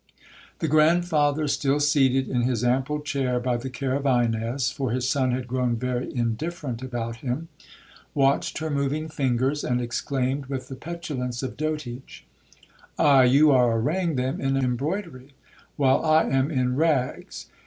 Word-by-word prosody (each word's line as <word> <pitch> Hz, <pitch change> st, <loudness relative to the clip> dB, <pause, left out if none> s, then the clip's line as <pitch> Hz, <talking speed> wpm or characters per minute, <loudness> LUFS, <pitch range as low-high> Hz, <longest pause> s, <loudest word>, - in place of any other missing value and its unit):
'The 160 Hz, -, -2 dB
grandfather, 155 Hz, -1 st, +3 dB
still 140 Hz, 0 st, +1 dB
seated 135 Hz, -3 st, +3 dB
in 125 Hz, -, 0 dB
his 120 Hz, -1 st, 0 dB
ample 135 Hz, +4 st, 0 dB
chair 135 Hz, -4 st, -1 dB
by 125 Hz, 0 st, -1 dB
the 120 Hz, +3 st, -4 dB
care 130 Hz, 0 st, -3 dB
of 140 Hz, +1 st, -1 dB
Ines, 120 Hz, 0 st, +1 dB
(for 135 Hz, -4 st, -3 dB
his 125 Hz, +2 st, -1 dB
son 130 Hz, -1 st, +1 dB
had 125 Hz, 0 st, -3 dB
grown 125 Hz, -1 st, 0 dB
very 125 Hz, +1 st, -3 dB
indifferent 125 Hz, +2 st, -3 dB
about 120 Hz, -3 st, -4 dB
him), 135 Hz, +7 st, -4 dB, 0.7 s
watched 140 Hz, 0 st, +2 dB
her 155 Hz, 0 st, -3 dB
moving 145 Hz, +2 st, -1 dB
fingers, 135 Hz, -1 st, 0 dB
and 125 Hz, 0 st, 0 dB
exclaimed, 130 Hz, +2 st, -2 dB
with 130 Hz, -2 st, -5 dB
the 135 Hz, -, -6 dB
petulance 135 Hz, -6 st, -5 dB
of 130 Hz, -, -4 dB
dotage, 150 Hz, -5 st, -5 dB, 0.7 s
'Aye,—you 140 Hz, +1 st, +5 dB
are 120 Hz, -3 st, +4 dB
arraying 165 Hz, +7 st, 0 dB
them 130 Hz, +1 st, -2 dB
in 135 Hz, 0 st, +1 dB
embroidery, 135 Hz, -, -3 dB, 0.4 s
while 135 Hz, -2 st, +2 dB
I 155 Hz, 0 st, +4 dB
am 135 Hz, +2 st, +1 dB
in 125 Hz, -4 st, 0 dB
rags. 145 Hz, -4 st, -1 dB
135 Hz, 150 wpm, -25 LUFS, 125-150 Hz, 0.7 s, Aye,—you